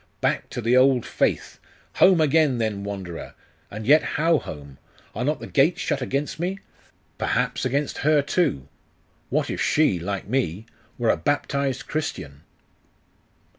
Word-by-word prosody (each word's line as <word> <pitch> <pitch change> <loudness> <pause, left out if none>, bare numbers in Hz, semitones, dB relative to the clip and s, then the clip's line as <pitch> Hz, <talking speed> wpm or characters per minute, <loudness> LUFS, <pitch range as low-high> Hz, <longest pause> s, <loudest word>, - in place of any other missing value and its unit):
Back - - -1
to 120 - -5
the 120 +2 +2
old 130 -1 +4
faith! - - -1 0.4
Home 185 -2 +6
again, 155 -3 +3
then 110 -3 -2
wanderer! 95 -4 -7 0.3
And 105 +1 -7
yet 150 +6 +6 0.2
how 165 0 +3
home? 70 -3 -10 0.3
Are 120 - -3
not 150 +4 0
the - - -7
gates 145 +5 +2
shut 140 - -1
against 140 +4 -2
me? 180 +3 -2 0.6
Perhaps - - 0
against 140 +3 -1
her 150 0 +3
too.... 140 - 0 0.6
What - - 0
if - - -3
she, 150 - +2
like 100 +3 -4
me, 110 -5 -1 0.3
were 120 -2 +2
a - - 0
baptized 140 -2 -1
Christian? 75 - -4
130 Hz, 145 wpm, -24 LUFS, 100-150 Hz, 0.6 s, Home